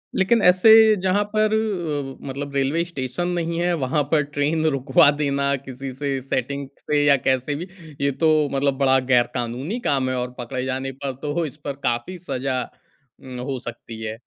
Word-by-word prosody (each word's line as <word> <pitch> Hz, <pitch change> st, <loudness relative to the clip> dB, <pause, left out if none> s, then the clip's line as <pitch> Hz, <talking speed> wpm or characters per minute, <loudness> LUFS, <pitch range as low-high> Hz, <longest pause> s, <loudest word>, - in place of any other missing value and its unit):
लेकिन 220 Hz, +4 st, +3 dB
ऐसे 185 Hz, +5 st, +6 dB, 0.3 s
जहाँ 190 Hz, +2 st, +2 dB
पर 215 Hz, 0 st, +3 dB
अ, 165 Hz, -11 st, -2 dB
मतलब 140 Hz, +1 st, -5 dB
रेलवे 140 Hz, +5 st, +1 dB
स्टेशन 140 Hz, +1 st, -4 dB
नहीं 170 Hz, -1 st, -2 dB
है, 175 Hz, 0 st, +1 dB
वहाँ 145 Hz, +3 st, +1 dB
पर 155 Hz, -2 st, +4 dB
ट्रेन 155 Hz, +2 st, 0 dB
रुकवा 140 Hz, -1 st, +4 dB
देना 140 Hz, -1 st, +1 dB
किसी 135 Hz, 0 st, -7 dB
से, 135 Hz, -1 st, -2 dB
सेटिंग 135 Hz, +1 st, -3 dB
से 145 Hz, -1 st, +1 dB
या 140 Hz, -1 st, +6 dB
कैसे 130 Hz, +2 st, +1 dB
भी 175 Hz, +5 st, -5 dB, 0.3 s
ये 140 Hz, 0 st, +2 dB
तो 160 Hz, +4 st, +1 dB, 0.3 s
मतलब 135 Hz, -1 st, +1 dB
बड़ा 135 Hz, -1 st, +4 dB
गैर-कानूनी 125 Hz, -, 0 dB
काम 135 Hz, -2 st, +1 dB
है। 130 Hz, -, -1 dB
और 125 Hz, 0 st, -3 dB
पकड़े 125 Hz, +1 st, -4 dB
जाने 135 Hz, +1 st, -3 dB
पर 135 Hz, -2 st, -2 dB
तो 150 Hz, +3 st, -1 dB
इस 145 Hz, 0 st, -8 dB
पर 140 Hz, -, -2 dB
काफ़ी 120 Hz, +10 st, -2 dB
सज़ा 130 Hz, -6 st, -2 dB, 0.6 s
उम, 130 Hz, -2 st, -8 dB
हो 130 Hz, 0 st, -3 dB
सकती 115 Hz, -2 st, -9 dB
है। 110 Hz, 0 st, -4 dB
140 Hz, 175 wpm, -22 LUFS, 130-160 Hz, 0.6 s, ऐसे